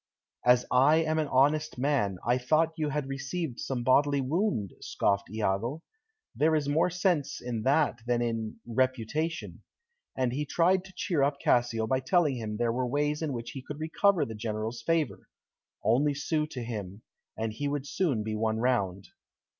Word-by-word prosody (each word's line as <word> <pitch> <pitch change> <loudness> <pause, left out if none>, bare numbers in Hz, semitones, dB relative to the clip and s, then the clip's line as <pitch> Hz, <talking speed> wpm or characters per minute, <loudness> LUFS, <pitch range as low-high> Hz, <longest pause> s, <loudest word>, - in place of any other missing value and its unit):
"As 125 0 +5
I 135 +5 +5
am 160 0 0
an 155 - 0
honest 145 +3 +2
man, 125 -8 +1
I 120 +2 +2
thought 155 +6 +2
you 155 -2 -1
had 150 -1 -2
received 140 +1 -4
some 125 -3 -3
bodily 140 +3 +3
wound," 135 - -1
scoffed 100 -1 0
Iago. 110 - -1 0.5
"There 155 +1 +3
is 150 -2 0
more 155 +5 +2
sense 180 -5 0
in 120 -2 -4
that 145 +3 +2
than 120 -1 +2
in 115 -2 -2
'reputation.'" 130 +6 -1 0.6
And 130 -2 +1
he 145 +3 -1
tried 180 +5 +2
to 190 - -14
cheer 175 -7 0
up 140 +1 +1
Cassio 120 -4 +2
by 130 +4 +1
telling 145 0 +2
him 110 -2 -4
there 115 0 +1
were 125 +1 -1
ways 145 +3 0
in 155 -3 -1
which 120 -2 -5
he 135 - -7
could 145 +3 -8
recover 175 +4 +2
the 110 - -6
General's 110 +1 -4
favour, 155 - -1 0.5
only 140 +6 +3
sue 150 +1 -1
to 125 -5 -6
him, 105 -3 -6 0.3
and 110 -1 -2
he 145 +6 -3
would 140 -1 -2
soon 140 - 0
be 110 0 -3
won 110 0 0
round. 100 -6 0
130 Hz, 175 wpm, -29 LUFS, 115-155 Hz, 0.6 s, As